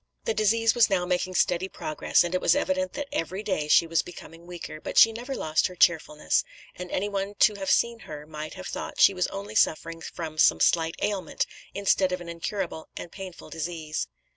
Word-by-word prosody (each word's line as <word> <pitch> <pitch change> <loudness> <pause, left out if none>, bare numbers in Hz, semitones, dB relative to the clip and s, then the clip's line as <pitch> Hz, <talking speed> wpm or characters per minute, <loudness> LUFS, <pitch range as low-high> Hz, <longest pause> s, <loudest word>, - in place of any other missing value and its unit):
"The 225 - +1
disease 225 +2 +3
was 235 -2 +4
now 185 -3 +1
making 180 +1 -1
steady 180 +2 +2
progress, 155 0 +1
and 175 0 -3
it 185 - 0
was - - +4
evident 280 -1 0
that 290 - -4
every 185 +5 -3
day 185 -8 -1
she 160 - +5
was 165 -1 +1
becoming 170 -1 -12
weaker; 170 -3 -8
but - - -5
she 225 - +8
never 245 +4 -5
lost 155 0 +1
her 180 - -11
cheerfulness, 155 -3 +2 0.3
and 180 0 -7
anyone 200 +1 -2
to 210 - +5
have 195 -2 -4
seen 235 +3 +2
her 150 -6 -9
might 155 0 -7
have 185 -1 -8
thought - - -6
she - - +7
was 180 -1 0
only 200 +2 -7
suffering 165 -4 +1
from 160 -1 -6
some - - +5
slight 165 -1 +2
ailment, 200 -2 -1 0.3
instead 195 -2 +2
of 180 - -2
an 175 -1 -9
incurable 170 0 -4
and 170 - -7
painful 190 -3 -9
disease." 160 -1 -4
180 Hz, 200 wpm, -26 LUFS, 165-205 Hz, 0.3 s, she